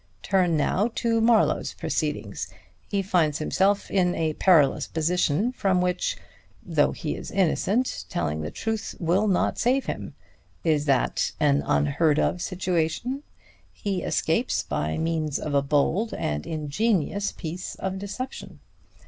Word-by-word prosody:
Turn 180 -4 +2
now 190 +9 +1
to 230 -1 +1
Marlowe's 225 -1 +3
proceedings. - - -2 0.4
He 200 -1 0
finds 165 -6 +2
himself 195 +6 +1
in 180 -2 +2
a 160 -1 0
perilous 155 -6 +4
position 175 +5 +1
from 195 -7 +1
which, 180 0 0 0.5
though - - +2
he - - -4
is - - -7
innocent, 195 - 0
telling 80 -2 -2
the 75 - -3
truth 220 -1 -3
will 185 +5 +2
not 190 -3 +1
save 260 +3 +2
him. - - -5 0.5
Is 155 -3 +2
that 135 -3 +1
an 145 -1 +3
unheard 145 +1 +2
of 180 - +1
situation? 180 - -1 0.5
He 195 -3 -3
escapes - - 0
by 80 +1 -2
means 160 -3 -1
of 150 - -4
a 140 - +4
bold 150 +10 +1
and 75 0 -3
ingenious 185 +5 0
piece 175 +2 -6
of 190 0 -4
deception. 255 +7 -6
180 Hz, 135 wpm, -25 LUFS, 150-200 Hz, 0.5 s, perilous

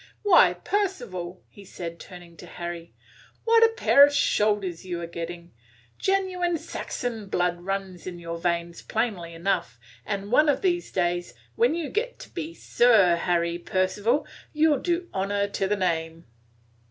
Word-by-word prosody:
"Why, 350 - +6
Percival!" 195 - -3
he 205 - -15
said, 170 -3 -7
turning 175 -2 -12
to - - -11
Harry, 170 -1 -7 0.5
"what 460 0 +5
a - - +9
pair 280 -10 +6
of 290 - +6
shoulders 205 -10 +1
you 180 -2 -4
are 170 - -4
getting! 170 +1 -7 0.5
Genuine 370 -3 0
Saxon 230 -7 -5
blood 175 -2 0
runs 190 -1 -4
in 180 -1 -6
your 170 -1 -6
veins 170 -1 -2
plainly 195 -7 -2
enough, 165 -9 -1 0.3
and 200 0 -4
one 300 +4 +5
of 290 - +1
these 350 -2 0
days, 175 -1 -1 0.2
when 465 -7 +3
you 335 -3 -3
get - - -2
to - - -12
be 335 -1 -6
Sir 215 -8 +4
Harry 170 0 0
Percival, 190 +9 0 0.3
you 310 0 +4
'll 280 - 0
do 350 0 -1
honor 200 +1 0
to 195 -1 -1
the 210 +1 0
name." 165 -3 -2
195 Hz, 155 wpm, -26 LUFS, 175-290 Hz, 0.5 s, a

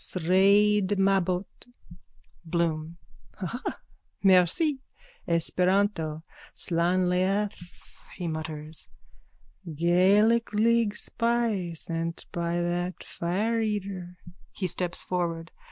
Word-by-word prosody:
Sraid 200 +3 +3
Mabbot. 190 -1 +2 1.0
BLOOM: 165 -1 -2 0.4
Haha. 210 +6 -4 0.5
Merci. 195 - +4 0.5
Esperanto. 170 -1 +1 0.3
Slan 175 +2 +1
leath. 195 +3 +1 0.6
(He 180 -2 -4
mutters.) 155 -1 -4 0.9
Gaelic 200 +8 +3
league 225 0 +2
spy, 230 -9 -1
sent 165 +1 -4
by 170 0 -1
that 175 +1 -2
fireeater. 200 -1 -2 0.4
_(He 185 - -1
steps 180 0 -1
forward. 170 -2 -2
180 Hz, 75 wpm, -27 LUFS, 170-205 Hz, 1.0 s, Merci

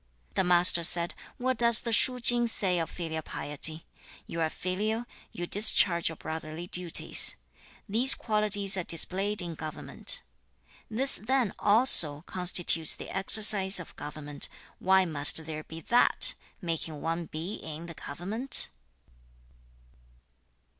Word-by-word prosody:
The - - -1
Master 175 -1 +4
said, 170 0 +1 0.2
'What 255 -1 -4
does 235 -1 +5
the 230 - -6
Shu 250 +3 +3
ching 240 0 +3
say 185 -5 -1
of 165 - -5
filial 160 -2 -7
piety? 155 +2 0 0.4
"You 165 - -7
are 160 - -1
filial, 215 +8 -5 0.3
you 175 - -7
discharge 180 -3 +2
your 160 - -9
brotherly 160 +1 -9
duties. 180 -1 +1 0.5
These 235 +6 +4
qualities 210 -3 +1
are 185 - -3
displayed 190 +4 -1
in 170 -1 -8
government." 155 -1 -5 0.7
This 260 +5 +5
then 245 -2 -3
also 200 - +6
constitutes 175 -3 0
the - - -11
exercise 195 -1 +3
of 170 - -12
government. 145 -1 -5 0.3
Why 190 0 +1
must 155 0 +1
there 155 -1 -8
be 160 +1 -12
THAT 240 +9 +3 0.3
making 165 -2 -4
one 165 +1 -5
be 165 +7 -7
in 160 +1 -10
the 170 - -10
government?' 195 - -4
180 Hz, 130 wpm, -26 LUFS, 160-215 Hz, 0.7 s, also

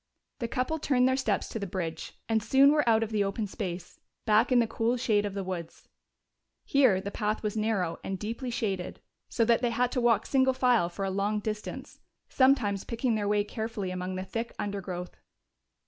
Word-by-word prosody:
The 235 - -2
couple 255 +6 -1
turned 255 -4 +3
their 260 - +2
steps 265 - 0
to 225 - -4
the 200 - -4
bridge 170 -3 -4
and 225 -1 +1
soon 275 +5 +5
were 300 -5 +2
out 225 0 +4
of 225 - -5
the 210 -2 +2
open 200 +2 -2
space, 185 -4 -6 0.3
back 220 +3 +3
in 250 - +5
the 235 - +5
cool 230 +2 0
shade 210 -4 +1
of 200 - -7
the 195 - -2
woods. 175 -3 -6 0.8
Here 255 -9 +4
the 200 +1 -5
path 215 +1 -2
was 210 0 -2
narrow 205 -6 -1
and 190 - -3
deeply 230 +6 -4
shaded, 195 -6 -3 0.3
so 230 - +1
that 235 +1 +3
they 245 - +2
had 245 +1 0
to 250 - 0
walk 230 -3 +3
single 265 -1 +3
file 250 -8 +3
for 195 +3 -4
a 190 - -1
long 200 +2 0
distance, 215 0 -6 0.3
sometimes 250 -7 +3
picking 235 +1 -1
their 210 -2 -1
way 205 0 +2
carefully 215 -3 -4
among 185 0 -4
the 185 0 -4
thick 230 +4 -4
undergrowth. 185 -3 -5
215 Hz, 200 wpm, -29 LUFS, 195-240 Hz, 0.8 s, soon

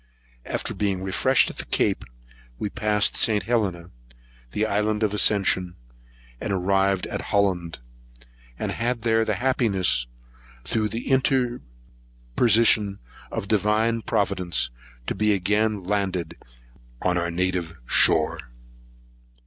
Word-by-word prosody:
After - - -3
being 95 -2 -2
refreshed 120 +7 +2
at - - -16
the - - -4
Cape, - - 0 0.5
we 105 - -3
passed 105 -2 +2
St. 105 -2 +3
Helena, 95 -8 -1 0.6
the 105 - -1
island 105 +1 0
of 105 -1 0
Ascension, 95 -3 +2 0.6
and - - -4
arrived 95 0 +1
at - - -4
Holland; 95 -5 0 0.8
and - - -3
had 115 0 -2
the 115 -1 +1
happiness, 95 - +1 0.6
through 110 - -1
the 115 +3 -6
interposition 100 - 0 0.3
of 100 - -4
divine 110 +2 +1
Providence, 90 - -1 0.3
to - - -2
be 105 +1 +1
again 105 +2 0
landed 95 -2 -2 0.7
on 90 0 +1
our 85 -1 -1
native 90 -1 -2
shore. 80 +5 +4
100 Hz, 110 wpm, -24 LUFS, 90-110 Hz, 0.8 s, shore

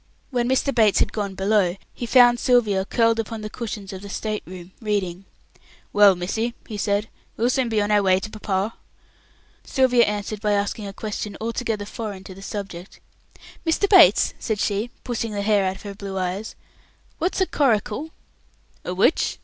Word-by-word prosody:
When 245 -1 0
Mr. 265 +1 +1
Bates 220 -4 +4
had - - +2
gone 200 -3 -3
below, 195 -2 +2 0.2
he 240 - -5
found 245 -1 +6
Sylvia 220 -7 +2
curled 230 +1 +2
upon 225 0 -4
the 215 0 -6
cushions 210 -4 -6
of 190 - -7
the 200 - -9
state 215 +1 -3
room, 180 0 -10
reading. 195 -4 -2 0.7
"Well, 205 -2 +7
missy!" 220 +7 -2
he 220 - -6
said, 205 +1 0 0.3
"we'll 235 +3 +2
soon 255 -2 0
be 220 -2 +1
on 205 - -1
our 205 -1 +4
way 190 -1 +3
to 215 - -6
papa." 205 0 -2 0.9
Sylvia 250 -3 +3
answered 210 0 -3
by 210 -1 +1
asking 205 +1 -1
a - - -5
question 210 0 -5
altogether 225 -2 -2
foreign 205 -3 -6
to 190 - -10
the 195 - -13
subject. 195 -2 -7 0.6
"Mr. 325 +4 +1
Bates," 390 -1 +6
said 220 -3 -2
she, 205 +3 -1
pushing 230 -3 -3
the 200 -1 -2
hair 205 -2 +3
out 190 - -5
of 195 - -13
her 200 -1 -6
blue 195 -1 -6
eyes, 185 +3 -3 0.6
"what's 355 +4 -1
a 375 - +4
coracle?" 270 - 0 0.7
"A - - -4
which?" - - +2
210 Hz, 180 wpm, -23 LUFS, 195-230 Hz, 0.9 s, Well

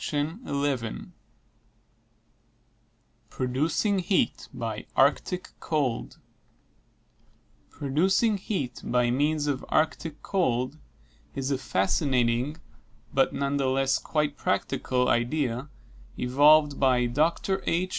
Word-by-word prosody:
PRODUCING 155 - 0
HEAT 185 +1 0
BY - - -5
ARCTIC 180 -1 +2
COLD 140 -7 -2 1.5
Producing 190 - +1
heat 185 - -4
by 125 -1 +1
means 150 +3 +1
of 140 -3 -1
Arctic 155 0 -1
cold 135 -6 0 0.6
is 135 0 -2
a 135 - 0
fantastic 120 +7 +1 0.6
but - - +3
none 140 0 -1
the 135 -1 +1
less 135 +1 +2
quite 150 -2 -1
practicable 125 -2 0
idea 125 +1 0 0.5
evolved 145 +3 +4
by 130 -2 +3
Dr. 165 +9 0
H. 180 +2 +1
140 Hz, 85 wpm, -27 LUFS, 125-155 Hz, 1.5 s, evolved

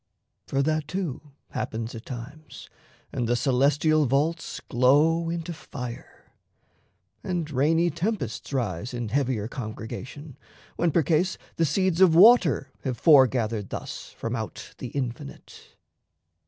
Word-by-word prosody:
For 135 0 +1
that, 155 0 0
too, 160 -6 -4 0.2
Happens 115 +1 -4
at 115 -1 -9
times, 140 +5 -9 0.4
and 120 - -1
the 120 - +3
celestial 145 +4 +2
vaults 155 +6 0
Glow 150 +7 +3
into 170 0 -4
fire, 125 -6 -9 0.9
and 175 -4 -2
rainy 160 +5 +2
tempests 170 - -3
rise 120 -3 -2
In 120 -3 -3
heavier 125 -4 0
congregation, 125 +4 -7 0.4
when, 170 -1 +1
percase, 165 +3 +2 0.2
The 165 - +3
seeds 185 +3 +1
of 175 -4 +6
water 180 - +6
have 130 -3 -2
foregathered 120 - +4
thus - - -6
From - - -3
out - - -6
the - - -5
infinite. 120 - -6
140 Hz, 120 wpm, -26 LUFS, 120-165 Hz, 0.9 s, of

